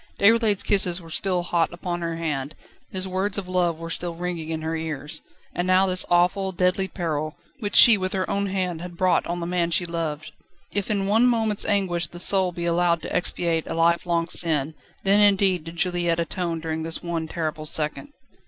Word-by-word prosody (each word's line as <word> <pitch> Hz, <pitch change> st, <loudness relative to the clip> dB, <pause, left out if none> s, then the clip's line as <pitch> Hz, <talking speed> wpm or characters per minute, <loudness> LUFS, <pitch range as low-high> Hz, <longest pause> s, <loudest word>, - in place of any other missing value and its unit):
Déroulède's 220 Hz, -1 st, +4 dB
kisses 185 Hz, -3 st, +3 dB
were 165 Hz, -2 st, -13 dB
still 180 Hz, +2 st, 0 dB
hot 170 Hz, -1 st, 0 dB
upon 175 Hz, 0 st, -4 dB
her 165 Hz, -1 st, -3 dB
hand, 150 Hz, -3 st, -3 dB, 0.3 s
his 190 Hz, 0 st, -2 dB
words 190 Hz, +2 st, -1 dB
of 195 Hz, -2 st, -4 dB
love 180 Hz, -3 st, 0 dB
were 165 Hz, 0 st, -7 dB
still 170 Hz, 0 st, -4 dB
ringing 170 Hz, -2 st, -4 dB
in 160 Hz, -1 st, -4 dB
her 160 Hz, +1 st, -2 dB
ears. 150 Hz, -3 st, -4 dB, 0.3 s
And 175 Hz, -, -2 dB
now 185 Hz, +1 st, +4 dB
this 185 Hz, -1 st, +3 dB
awful, 180 Hz, +2 st, +2 dB
deadly 180 Hz, +1 st, +1 dB
peril, 155 Hz, -5 st, -3 dB, 0.2 s
which 205 Hz, -4 st, -4 dB
she 225 Hz, -4 st, +9 dB
with 185 Hz, 0 st, -2 dB
her 190 Hz, -1 st, -1 dB
own 200 Hz, -1 st, 0 dB
hand 185 Hz, -4 st, -2 dB
had 175 Hz, -1 st, -8 dB
brought 185 Hz, 0 st, +2 dB
on 175 Hz, +1 st, -3 dB
the -, -, -3 dB
man 175 Hz, -1 st, 0 dB
she 175 Hz, +1 st, +1 dB
loved! 160 Hz, -3 st, -4 dB, 0.4 s
If 205 Hz, -1 st, -1 dB
in 200 Hz, -2 st, 0 dB
one 220 Hz, +5 st, +4 dB
moment's 225 Hz, -4 st, +1 dB
anguish 180 Hz, -5 st, 0 dB
the 175 Hz, -, -11 dB
soul 190 Hz, 0 st, +1 dB
be 170 Hz, -1 st, -5 dB
allowed 170 Hz, -1 st, +1 dB
to -, -, -5 dB
expiate 170 Hz, -2 st, 0 dB
a -, -, -4 dB
lifelong 170 Hz, 0 st, +1 dB
sin, 160 Hz, -3 st, 0 dB, 0.3 s
then 200 Hz, +1 st, +4 dB
indeed 195 Hz, -4 st, +3 dB
did 165 Hz, +1 st, -8 dB
Juliette 175 Hz, -1 st, 0 dB
atone 170 Hz, -1 st, -3 dB
during 160 Hz, 0 st, -3 dB
this 165 Hz, 0 st, -2 dB
one 170 Hz, -2 st, -3 dB
terrible 155 Hz, -2 st, -3 dB
second. 155 Hz, -, -2 dB
175 Hz, 200 wpm, -24 LUFS, 165-190 Hz, 0.4 s, she